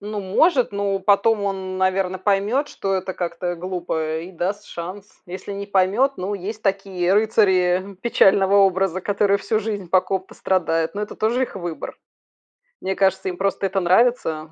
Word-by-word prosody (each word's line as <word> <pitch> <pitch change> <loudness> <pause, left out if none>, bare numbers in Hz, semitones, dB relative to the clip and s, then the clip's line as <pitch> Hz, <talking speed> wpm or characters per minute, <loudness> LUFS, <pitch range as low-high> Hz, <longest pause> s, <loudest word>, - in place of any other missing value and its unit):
Ну, 210 0 -5
может, 250 - +2
но 200 -1 -1
потом 205 +2 +3
он, 195 -1 -1 0.2
н - - -5
наверно, 185 0 0
поймет, 205 +9 +1
что 195 -1 -3
это 185 0 -3
как-то, 175 0 -4
э, 175 - -1
глупо, 165 -3 -3
и 175 +3 -9
даст 195 +4 -3
шанс. 185 +4 -7 0.2
Если 185 +3 -7
не 200 0 -5
поймет- 200 +8 +2
ну, 190 +3 -3
есть 205 +3 -6
такие 195 -2 0
рыцари, 190 -3 +2
э, - - -26
печального 195 -3 +4
образа, 190 -2 +3
которые 200 +1 +1
всю 215 +1 0
жизнь, 205 -5 -4
по 185 +2 +4
ком-то 190 0 -4
страдают. 165 -2 0
Но 210 - -3
это 210 - -6
тоже 235 +4 +1
их 240 - -4
выбор. 175 -3 -6 0.9
Мне 190 - -2
кажется, 190 -1 +1
им 180 - -6
просто 195 0 0
это 190 +1 -1
нравится: 175 -5 +2
195 Hz, 180 wpm, -22 LUFS, 185-205 Hz, 0.9 s, печального